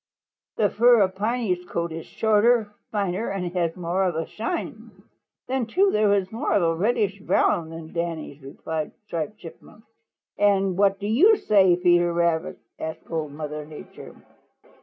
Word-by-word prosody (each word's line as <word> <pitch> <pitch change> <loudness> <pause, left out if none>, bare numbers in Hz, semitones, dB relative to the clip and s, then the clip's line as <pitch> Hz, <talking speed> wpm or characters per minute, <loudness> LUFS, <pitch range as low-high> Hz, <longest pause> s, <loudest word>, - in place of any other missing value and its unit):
"The 205 - +2
fur 235 0 +5
of 190 -1 +2
Piney's 210 -3 -1
coat 170 -1 -3
is 160 0 -7
shorter, 220 0 +2 0.2
finer 200 0 -1
and 180 -3 -4
has 170 -3 -1
more 180 +2 -1
of 175 -3 -1
a 165 0 -2
shine. 230 +11 -5 0.6
Then, 255 -3 -1
too, 385 - +2
it 210 -1 +3
is 190 -1 -3
more 225 - -2
of 200 - +3
a 165 0 +2
reddish 200 +2 0
brown 165 -3 +1
than 165 -1 -9
Danny's," 165 -4 -4
replied 155 +3 -5
Striped 170 +3 -4
Chipmunk. 175 +5 -14 0.6
"And 195 -2 +2
what 195 +1 +3
do 200 - -7
you 315 - +5
say, 190 - +4
Peter 175 -1 +3
Rabbit?" 170 -1 0 0.2
asked 160 +1 -7
Old 155 -3 -3
Mother 150 0 -5
Nature. 150 0 -12
185 Hz, 160 wpm, -24 LUFS, 165-210 Hz, 0.6 s, fur